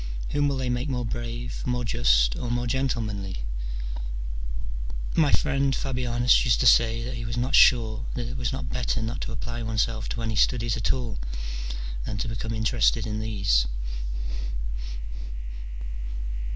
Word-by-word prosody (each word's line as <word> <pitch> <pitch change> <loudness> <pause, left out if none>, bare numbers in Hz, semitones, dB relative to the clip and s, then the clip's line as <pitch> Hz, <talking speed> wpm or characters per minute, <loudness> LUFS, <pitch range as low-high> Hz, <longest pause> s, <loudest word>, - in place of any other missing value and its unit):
whom 145 0 +2
will 140 -1 +1
they 130 -1 -1
make 125 +3 0
more 125 -2 -1
brave, 120 +1 -4
more 125 -1 0
just, - - +4
or 120 - -3
more 120 0 0
gentlemanly? 110 - -1 1.7
My 155 -3 +5
friend 140 -2 +3
Fabianus 125 -2 +3
used 120 -3 +3
to - - +2
say 115 0 +6
that 125 +2 -3
he 115 - -4
was 115 +1 -3
not 125 +3 0
sure 115 -2 +6
that 120 -2 -2
it 125 - -5
was 125 -1 -1
not 130 -1 -3
better 120 -2 0
not 115 +2 -3
to - - -3
apply 120 +1 -4
oneself 110 -1 0
to 115 - -3
any 110 -1 -1
studies 115 0 +3
at 115 - +1
all 120 -4 -2 0.8
than 105 - -3
to 110 - -2
become 115 0 -3
interested 110 +1 +3
in 105 -1 -2
these. 100 - +2
120 Hz, 150 wpm, -27 LUFS, 110-125 Hz, 1.7 s, say